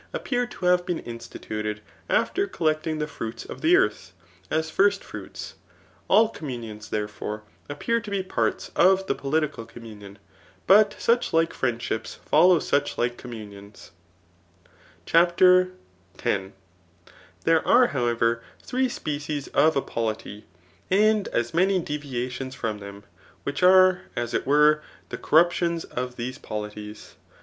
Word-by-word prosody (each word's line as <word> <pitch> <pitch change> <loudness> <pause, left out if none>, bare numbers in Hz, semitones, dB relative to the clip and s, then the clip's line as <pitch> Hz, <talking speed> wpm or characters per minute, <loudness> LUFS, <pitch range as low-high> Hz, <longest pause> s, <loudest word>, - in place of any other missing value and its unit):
811 - - +1
aqpptfttr 245 -2 -2
to 185 - -7
hare 180 0 +6
been 175 -1 -4
inodtuted 110 -2 -5 0.3
after 395 +1 +1
collecdng 155 - -1
the 150 - -1
fruits 115 -6 -7
of 130 - -9
tbe 165 +3 +4
eutb^ 105 -3 +1 0.4
as 160 0 -1
first 200 0 +2
fruits^ - - -8 0.5
All 225 +1 +5
communions, 120 - -7
therefore, 105 0 -4 0.3
wppcm 230 +11 -1
to - - -6
be 200 -1 -1
parts 185 - -2
of 190 +1 +4
the 135 - 0
pdkical 140 -4 -2
communion. 105 -4 -11 0.5
But 210 +3 +6
sucb 235 +1 +3
lflie 165 0 +2
fiiicfidshqis 115 -3 -3
fblbw 150 -7 +3
todi4ike - - -20
commimions. 105 -4 -11 1.1
CHAPTER 180 +2 +5 0.5
X. - - -16 1.2
Thihb 165 -1 +4
are^ 245 0 +5
howerer, 120 -2 +1 0.2
three 255 0 0
species 145 - -4
of 160 +1 +3
a 140 - +1
polity, 110 -2 -4 0.4
and 210 +1 +3
as 120 0 -2
many 190 +3 +3
deviations 130 -4 -4
from 110 -4 -3
them, 100 0 -10 0.4
which 140 - -3
are, 185 0 +6
as 120 -1 -3
it - - -1
were^ 150 +2 +4 0.3
tht - - -5
ccyruptions 170 +1 +2
of 125 0 -5
these 125 +1 -5
polities. 105 0 -7
145 Hz, 130 wpm, -25 LUFS, 115-180 Hz, 1.2 s, hare